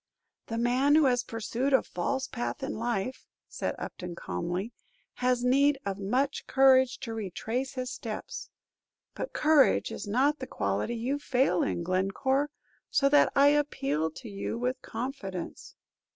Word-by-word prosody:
"The 230 - -3
man 255 +5 +3
who 310 -1 +6
has 245 -2 +3
pursued 235 +4 -2
a 265 - +5
false 265 +10 -2
path 245 +3 -4
in 275 - -2
life," 235 +1 -3 0.2
said - - -3
Upton, 180 -2 -6
calmly, 175 - -3 0.5
"has 250 -1 +2
need 275 +3 +4
of 200 0 -3
much 255 +8 -1
courage 260 -1 +5
to 230 -4 -4
retrace 225 +5 -3
his 255 -1 -4
steps; 225 -4 -6 0.6
but - - -5
courage 300 -2 +4
is - - -6
not 270 +8 +2
the 260 - -5
quality 100 - -1
you 255 +5 -1
fail 250 -10 +2
in, 170 - -1
Glencore, 195 +11 +1 0.4
so 275 - +3
that 290 +1 +5
I 280 +1 +7
appeal 160 - +1
to 195 +10 -10
you 200 +2 -4
with 250 +2 -2
confidence." 220 -7 -6
250 Hz, 150 wpm, -29 LUFS, 200-270 Hz, 0.6 s, I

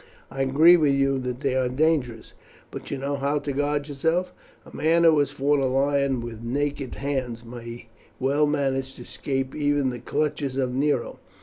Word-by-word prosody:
I 135 - -3
agree 155 +7 +6
with 145 -4 +3
you 135 -1 +1
that 125 0 -4
they 135 -3 0
are 130 -1 +1
dangerous; 130 -5 0 0.4
but - - -8
you 140 - -3
know 140 +1 -2
how 140 +2 0
to 145 -1 -3
guard 145 +1 -1
yourself. 160 +6 -1 0.3
A - - -14
man 165 +2 +2
who 160 -3 +6
has 145 -2 +2
fought 145 0 +1
a 135 - +1
lion 135 -1 +1
with 115 -1 -7
naked 140 +2 -2
hands 130 -4 -3
may 120 0 -9 0.3
well 140 +3 +2
manage 135 -2 -1
to - - -10
escape 135 -1 -3
even 145 -3 +1
the 120 - -6
clutches 145 +1 -2
of 130 -2 0
Nero. 145 +3 -1
140 Hz, 185 wpm, -25 LUFS, 130-145 Hz, 0.4 s, agree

